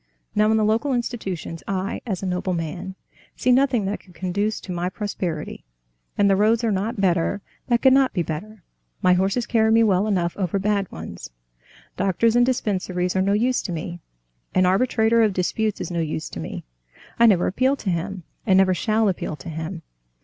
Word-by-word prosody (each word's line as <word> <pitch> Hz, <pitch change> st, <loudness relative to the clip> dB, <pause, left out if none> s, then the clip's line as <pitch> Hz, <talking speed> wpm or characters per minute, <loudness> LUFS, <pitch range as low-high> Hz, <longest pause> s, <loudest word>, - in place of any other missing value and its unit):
Now 210 Hz, +1 st, +3 dB
in 220 Hz, -, +3 dB
the 215 Hz, -, +2 dB
local 230 Hz, +6 st, +1 dB
institutions 195 Hz, -9 st, -4 dB
I, 195 Hz, 0 st, -2 dB
as 195 Hz, -4 st, -3 dB
a -, -, -1 dB
nobleman, 180 Hz, 0 st, -3 dB, 0.4 s
see 255 Hz, -, +1 dB
nothing 250 Hz, -4 st, +3 dB
that 200 Hz, +2 st, -2 dB
could 180 Hz, -3 st, -20 dB
conduce 200 Hz, +4 st, -1 dB
to 185 Hz, -, -8 dB
my 175 Hz, 0 st, -1 dB
prosperity, 180 Hz, -6 st, -4 dB, 0.5 s
and 205 Hz, -, +4 dB
the 195 Hz, -, +4 dB
roads 220 Hz, +4 st, +3 dB
are 225 Hz, -, +2 dB
not 205 Hz, +3 st, -2 dB
better 180 Hz, +1 st, +1 dB, 0.3 s
and 240 Hz, -1 st, +3 dB
could 265 Hz, 0 st, +5 dB
not 270 Hz, -1 st, +4 dB
be 175 Hz, -, -1 dB
better; 180 Hz, +6 st, -6 dB, 0.4 s
my 180 Hz, -, +5 dB
horses 195 Hz, +6 st, +1 dB
carry 220 Hz, -2 st, +2 dB
me 225 Hz, +1 st, +5 dB
well 200 Hz, -1 st, +2 dB
enough 175 Hz, -5 st, 0 dB
over 190 Hz, -1 st, -1 dB
bad 200 Hz, -1 st, 0 dB
ones. 80 Hz, -7 st, -8 dB, 0.7 s
Doctors 195 Hz, +5 st, +2 dB
and 240 Hz, -, +5 dB
dispensaries 185 Hz, -7 st, -1 dB
are 190 Hz, -, +3 dB
no 200 Hz, +1 st, +2 dB
use 245 Hz, +4 st, +2 dB
to 185 Hz, -, -5 dB
me. 170 Hz, +1 st, -5 dB, 0.6 s
An 185 Hz, -, +4 dB
arbitrator 220 Hz, +3 st, +3 dB
of 215 Hz, -3 st, +3 dB
disputes 210 Hz, +4 st, -1 dB
is -, -, -4 dB
no 170 Hz, -, -1 dB
use 155 Hz, -1 st, -3 dB
to -, -, -7 dB
me. -, -, -6 dB, 0.6 s
I 235 Hz, -, +7 dB
never 190 Hz, -5 st, +4 dB
appeal 260 Hz, +8 st, +2 dB
to 200 Hz, -8 st, -3 dB
him, 180 Hz, +2 st, -3 dB, 0.2 s
and 190 Hz, -4 st, +4 dB
never 190 Hz, -1 st, +4 dB
shall 215 Hz, +3 st, +1 dB
appeal 180 Hz, -4 st, -2 dB
to 165 Hz, -, -9 dB
him. 160 Hz, +2 st, -5 dB
195 Hz, 195 wpm, -23 LUFS, 180-220 Hz, 0.7 s, I